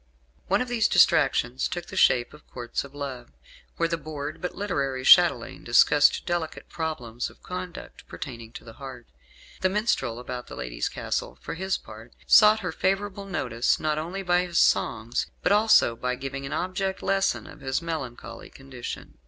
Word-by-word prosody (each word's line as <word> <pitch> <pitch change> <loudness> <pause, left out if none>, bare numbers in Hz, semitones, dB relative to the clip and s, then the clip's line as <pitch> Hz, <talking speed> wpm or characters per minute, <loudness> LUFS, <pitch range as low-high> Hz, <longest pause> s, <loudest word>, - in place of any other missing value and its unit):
One 195 +6 +2
of - - -10
these 240 -3 +2
distractions 135 -6 +3
took 175 -1 -5
the - - -10
shape 125 -9 +3
of 150 - -16
Courts 120 -2 -4
of 140 0 -13
Love, 130 -4 -6 0.5
where 165 - +2
the 165 0 -2
bored 150 -1 -6
but 180 - -4
literary 140 -10 -2
chatelaine - - +5
discussed 150 0 +4
delicate 175 -2 -3
problems 125 -8 -4
of - - -21
conduct 180 -1 -8
pertaining 115 -5 -8
to - - -9
the 115 - -12
heart. 130 -3 -8 0.5
The 185 - +2
minstrel 185 - 0
about 125 0 -6
the - - -9
lady's 60 -1 -3
castle, - - -4
for - - -6
his 190 +3 -1
part, 110 +2 -13
sought 215 0 +7
her 180 -3 -3
favourable 195 +3 -1
notice 125 -11 0
not 155 -1 0
only 180 +5 -5
by 180 0 +2
his 170 -1 -3
songs 110 +4 +2 0.2
but - - +2
also 210 - +5
by 125 +2 -2
giving 135 +1 -5
an - - -8
object 190 +1 -2
lesson 195 0 +1
of - - -12
his 135 -1 -1
melancholy 160 -8 -6
condition. 130 - -9
150 Hz, 170 wpm, -26 LUFS, 125-185 Hz, 0.5 s, sought